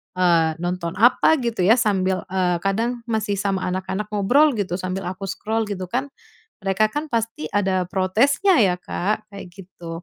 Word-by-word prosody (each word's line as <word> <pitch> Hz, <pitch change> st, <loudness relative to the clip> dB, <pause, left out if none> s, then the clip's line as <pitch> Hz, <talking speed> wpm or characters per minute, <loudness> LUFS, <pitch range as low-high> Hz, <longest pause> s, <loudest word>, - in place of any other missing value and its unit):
eee, 170 Hz, -3 st, +3 dB
nonton 175 Hz, 0 st, -3 dB
apa 245 Hz, +8 st, +4 dB
gitu 235 Hz, -4 st, -3 dB
ya, 220 Hz, -, +6 dB
sambil, 190 Hz, -5 st, 0 dB
eee, 180 Hz, -2 st, +1 dB
kadang 230 Hz, +4 st, -1 dB
masih 215 Hz, -2 st, -1 dB
sama 195 Hz, -1 st, -1 dB
anak-anak 190 Hz, +3 st, -3 dB
ngobrol 265 Hz, +8 st, +4 dB
gitu, 190 Hz, -4 st, -2 dB
sambil 185 Hz, +1 st, -4 dB
aku 190 Hz, +1 st, -6 dB
scroll 220 Hz, +3 st, -2 dB
gitu 185 Hz, -3 st, -5 dB
kan. 260 Hz, +3 st, -1 dB, 0.6 s
Mereka 205 Hz, +3 st, +2 dB
kan 295 Hz, +4 st, -3 dB
pasti 225 Hz, -9 st, -2 dB
ada 190 Hz, -3 st, +1 dB
protesnya 250 Hz, -, +2 dB
ya, 190 Hz, -5 st, +4 dB
Kak, 210 Hz, +4 st, -3 dB
kayak 200 Hz, -2 st, -9 dB
gitu. 175 Hz, -3 st, -9 dB
195 Hz, 160 wpm, -22 LUFS, 185-225 Hz, 0.6 s, ya